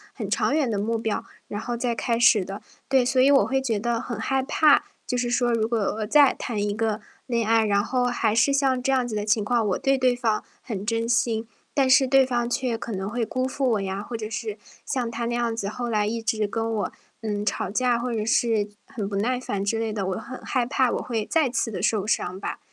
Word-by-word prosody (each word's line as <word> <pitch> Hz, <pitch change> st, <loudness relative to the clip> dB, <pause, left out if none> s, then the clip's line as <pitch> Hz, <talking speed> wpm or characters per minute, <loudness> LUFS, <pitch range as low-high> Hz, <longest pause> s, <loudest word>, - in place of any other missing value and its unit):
很 -, -, -4 dB
长 -, -, +1 dB
远 295 Hz, -5 st, +1 dB
的 215 Hz, -, -1 dB
目 225 Hz, +3 st, -1 dB
标， 220 Hz, -1 st, -2 dB, 0.2 s
然 205 Hz, -, -4 dB
后 240 Hz, -, -3 dB
再 240 Hz, 0 st, 0 dB
开 230 Hz, 0 st, 0 dB
始 235 Hz, -4 st, +5 dB
的。 195 Hz, +3 st, -7 dB, 0.3 s
对， 265 Hz, -1 st, +4 dB
所 255 Hz, +1 st, +1 dB
以 265 Hz, -, +5 dB
我 275 Hz, -, +5 dB
会 270 Hz, -, +1 dB
觉 230 Hz, -6 st, -1 dB
得 235 Hz, +2 st, 0 dB
很 235 Hz, -2 st, -5 dB
害 265 Hz, +3 st, 0 dB
怕， 295 Hz, +2 st, +4 dB, 0.2 s
就 -, -, -1 dB
是 245 Hz, 0 st, 0 dB
说 240 Hz, 0 st, +2 dB
如 220 Hz, -1 st, +1 dB
果 230 Hz, 0 st, 0 dB
我 215 Hz, +1 st, -1 dB
再 285 Hz, +5 st, +5 dB
谈 220 Hz, -4 st, -3 dB
一 205 Hz, 0 st, 0 dB
个 220 Hz, -1 st, -1 dB, 0.2 s
恋 235 Hz, -3 st, 0 dB
爱， 225 Hz, -1 st, +4 dB
然 200 Hz, -1 st, +2 dB
后 250 Hz, +2 st, 0 dB
还 235 Hz, -3 st, +1 dB
是 235 Hz, +5 st, +4 dB
像 270 Hz, -2 st, +2 dB
这 270 Hz, -, +1 dB
样 255 Hz, -2 st, +2 dB
子 225 Hz, -, -4 dB
的 210 Hz, 0 st, -2 dB
情 210 Hz, 0 st, +2 dB
况， 230 Hz, +1 st, +1 dB
我 185 Hz, -, +1 dB
对 270 Hz, 0 st, +2 dB
对 255 Hz, -1 st, +3 dB
方 230 Hz, -3 st, 0 dB, 0.2 s
很 205 Hz, -5 st, -5 dB
真 230 Hz, +1 st, -1 dB
心， 230 Hz, -2 st, +1 dB, 0.3 s
但 270 Hz, -2 st, +2 dB
是 265 Hz, +1 st, +6 dB
对 270 Hz, +1 st, +5 dB
方 240 Hz, -2 st, 0 dB
却 245 Hz, -1 st, -1 dB
可 230 Hz, -, -6 dB
能 190 Hz, -1 st, -3 dB
会 235 Hz, +1 st, -1 dB
辜 255 Hz, +3 st, -2 dB
负 265 Hz, +1 st, -1 dB
我 215 Hz, -3 st, +1 dB
呀， 195 Hz, +1 st, -3 dB
或 235 Hz, -, -6 dB
者 215 Hz, -1 st, -4 dB
是 215 Hz, -1 st, -4 dB, 0.3 s
像 250 Hz, -4 st, -1 dB
他 235 Hz, 0 st, -3 dB
那 235 Hz, -, -2 dB
样 240 Hz, -1 st, 0 dB
子， 205 Hz, -3 st, -3 dB
后 240 Hz, +3 st, -4 dB
来 210 Hz, -2 st, +1 dB
一 225 Hz, +2 st, -2 dB
直 220 Hz, -2 st, 0 dB
跟 225 Hz, +2 st, -2 dB
我， 215 Hz, -, -1 dB, 0.3 s
嗯， 210 Hz, -2 st, -2 dB
吵 195 Hz, -2 st, -1 dB
架 245 Hz, +3 st, +1 dB
或 245 Hz, 0 st, -2 dB
者 215 Hz, -2 st, -1 dB
是 225 Hz, -2 st, +2 dB, 0.2 s
很 210 Hz, -4 st, -4 dB
不 200 Hz, -, -4 dB
耐 245 Hz, +5 st, 0 dB
烦 205 Hz, -6 st, -3 dB
之 225 Hz, +3 st, 0 dB
类 225 Hz, -1 st, -2 dB
的， 200 Hz, -3 st, -2 dB
我 190 Hz, -, -1 dB
很 255 Hz, +4 st, -8 dB
害 255 Hz, -3 st, 0 dB
怕 260 Hz, -1 st, +1 dB
我 -, -, 0 dB
会 225 Hz, -3 st, -2 dB
再 315 Hz, -5 st, +2 dB
次 240 Hz, -2 st, -1 dB
地 205 Hz, -, -4 dB
受 210 Hz, -3 st, +1 dB
伤 185 Hz, -4 st, -1 dB
吧， -, -, -5 dB
230 Hz, 270 characters per minute, -25 LUFS, 215-250 Hz, 0.3 s, 是